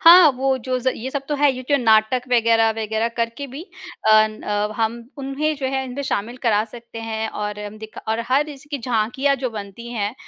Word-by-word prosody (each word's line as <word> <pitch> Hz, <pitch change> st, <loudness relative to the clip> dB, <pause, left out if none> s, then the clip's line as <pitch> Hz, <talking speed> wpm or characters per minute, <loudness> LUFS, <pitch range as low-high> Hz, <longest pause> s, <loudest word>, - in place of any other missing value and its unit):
हाँ, 340 Hz, 0 st, +9 dB
वो 265 Hz, 0 st, +1 dB
जो 255 Hz, +1 st, -2 dB
ज 260 Hz, +1 st, +1 dB
ये 260 Hz, -, -3 dB
सब 280 Hz, -1 st, -3 dB
तो 295 Hz, -, 0 dB
है, 290 Hz, 0 st, +4 dB
ये 255 Hz, -, -5 dB
जो 285 Hz, -, +4 dB
नाटक 220 Hz, +2 st, +4 dB
वगैरह-वगैरह 225 Hz, -2 st, +2 dB
करके 230 Hz, +4 st, -2 dB
भी 275 Hz, +5 st, -8 dB
अ, 220 Hz, -, -2 dB, 0.2 s
ना 210 Hz, -1 st, -2 dB
अ, 215 Hz, -, -7 dB
हम 230 Hz, +1 st, -1 dB, 0.2 s
उन्हें 275 Hz, +3 st, -1 dB
जो 270 Hz, -, -2 dB
है 265 Hz, 0 st, 0 dB
इनमें 260 Hz, +2 st, -5 dB
शामिल 235 Hz, -2 st, -2 dB
करा 215 Hz, -3 st, +3 dB
सकते 230 Hz, 0 st, -11 dB
हैं 220 Hz, 0 st, -3 dB
और 210 Hz, -1 st, -4 dB
हम 210 Hz, +1 st, -7 dB
दिख 215 Hz, 0 st, -10 dB
और 225 Hz, +1 st, +1 dB
हर 280 Hz, +4 st, +2 dB
इसकी 285 Hz, 0 st, -7 dB
झाँकियाँ 250 Hz, +4 st, +1 dB
जो 255 Hz, -1 st, -2 dB
बनती 210 Hz, +2 st, -8 dB
हैं 210 Hz, -1 st, -2 dB
235 Hz, 210 wpm, -22 LUFS, 220-270 Hz, 0.2 s, हाँ